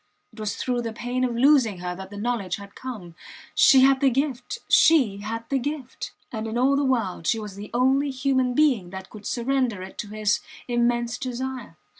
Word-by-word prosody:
It 220 Hz, -, -14 dB
was 215 Hz, -2 st, -2 dB
through 245 Hz, -1 st, -1 dB
the 230 Hz, -1 st, -4 dB
pain 245 Hz, +2 st, -2 dB
of 245 Hz, -2 st, 0 dB
losing 255 Hz, -5 st, +4 dB
her 180 Hz, 0 st, -4 dB
that 190 Hz, +1 st, -9 dB
the 205 Hz, -, -9 dB
knowledge 205 Hz, -4 st, -1 dB
had 200 Hz, -1 st, -11 dB
come. 215 Hz, -10 st, -8 dB, 0.4 s
She 265 Hz, -2 st, +6 dB
had 270 Hz, 0 st, +5 dB
the 275 Hz, -, +5 dB
gift! 265 Hz, -, -2 dB
She 270 Hz, -12 st, +5 dB
had 225 Hz, +3 st, -5 dB
the 275 Hz, -, +1 dB
gift! 275 Hz, -1 st, -5 dB, 0.2 s
And 220 Hz, -1 st, -4 dB
in 220 Hz, +1 st, -3 dB
all 265 Hz, +3 st, +3 dB
the 285 Hz, -, +1 dB
world 225 Hz, -11 st, -1 dB
she 225 Hz, -, +2 dB
was 210 Hz, -2 st, -6 dB
the 205 Hz, +1 st, -8 dB
only 265 Hz, +4 st, +2 dB
human 260 Hz, -1 st, 0 dB
being 255 Hz, -12 st, +3 dB
that 190 Hz, 0 st, -9 dB
could 210 Hz, -2 st, -9 dB
surrender 245 Hz, -5 st, 0 dB
it 190 Hz, -, -11 dB
to 210 Hz, -, -4 dB
his 210 Hz, 0 st, 0 dB, 0.3 s
immense 240 Hz, 0 st, 0 dB
desire. 255 Hz, -7 st, -5 dB
240 Hz, 200 wpm, -25 LUFS, 210-260 Hz, 0.4 s, She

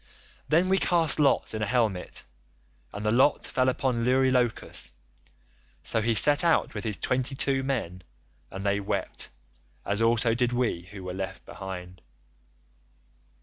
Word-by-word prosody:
Then 170 Hz, +4 st, +3 dB
we 190 Hz, +1 st, +3 dB
cast 165 Hz, -4 st, +2 dB
lots 140 Hz, -5 st, +2 dB
in 110 Hz, -, -3 dB
a 105 Hz, -, 0 dB
helmet, 110 Hz, -6 st, -1 dB, 0.7 s
and 105 Hz, +1 st, -6 dB
the 105 Hz, -, +2 dB
lot 130 Hz, +5 st, +3 dB
fell 130 Hz, 0 st, +1 dB
upon 125 Hz, -2 st, -1 dB
Eurylochus; 125 Hz, -1 st, +1 dB, 0.9 s
so 110 Hz, -, +1 dB
he 115 Hz, +1 st, +1 dB
set 145 Hz, -, +5 dB
out 170 Hz, -1 st, +2 dB
with 105 Hz, -, -5 dB
his 110 Hz, -3 st, -2 dB
twenty 130 Hz, +1 st, -1 dB
two 135 Hz, 0 st, +1 dB
men, 115 Hz, -10 st, -3 dB, 0.5 s
and 95 Hz, +1 st, -7 dB
they 100 Hz, 0 st, +1 dB
wept, 100 Hz, -, -3 dB, 0.6 s
as 100 Hz, +2 st, -1 dB
also 115 Hz, 0 st, +3 dB
did 125 Hz, +1 st, 0 dB
we 120 Hz, -8 st, 0 dB
who 100 Hz, -2 st, -9 dB
were 90 Hz, 0 st, -5 dB
left 95 Hz, 0 st, -6 dB
behind. 90 Hz, -2 st, -8 dB
115 Hz, 145 wpm, -27 LUFS, 100-130 Hz, 0.9 s, set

